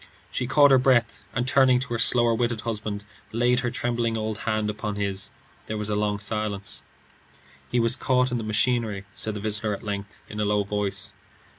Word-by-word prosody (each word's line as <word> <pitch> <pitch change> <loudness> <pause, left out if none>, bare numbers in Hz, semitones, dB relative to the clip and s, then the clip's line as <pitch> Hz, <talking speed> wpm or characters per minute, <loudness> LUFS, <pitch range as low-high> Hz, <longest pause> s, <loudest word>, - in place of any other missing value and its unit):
She 125 - -1
caught 145 +1 +6
her 135 - +7
breath, 120 -5 +2
and 125 +1 0
turning 130 -1 +5
to 125 -2 -4
her 115 - -1
slower 120 0 +4
witted 120 -1 0
husband, 105 -2 -4 0.3
laid 120 +2 +3
her 120 -1 0
trembling 120 -2 -1
old 110 0 -3
hand 110 -1 +1
upon 105 0 -3
his. 100 -1 -2 0.4
There 110 - -3
was 105 0 -1
a - - +1
long 105 0 0
silence. 105 -1 -3 0.9
"He 125 - +1
was 115 +1 +4
caught 125 -1 +2
in 120 - 0
the - - -4
machinery," 110 -2 0
said 110 -1 -2
the - - -3
visitor 105 0 0
at - - -12
length 105 -1 -5
in 105 - -7
a - - +2
low 105 0 +2
voice. 100 -1 -2
110 Hz, 195 wpm, -25 LUFS, 105-120 Hz, 0.9 s, her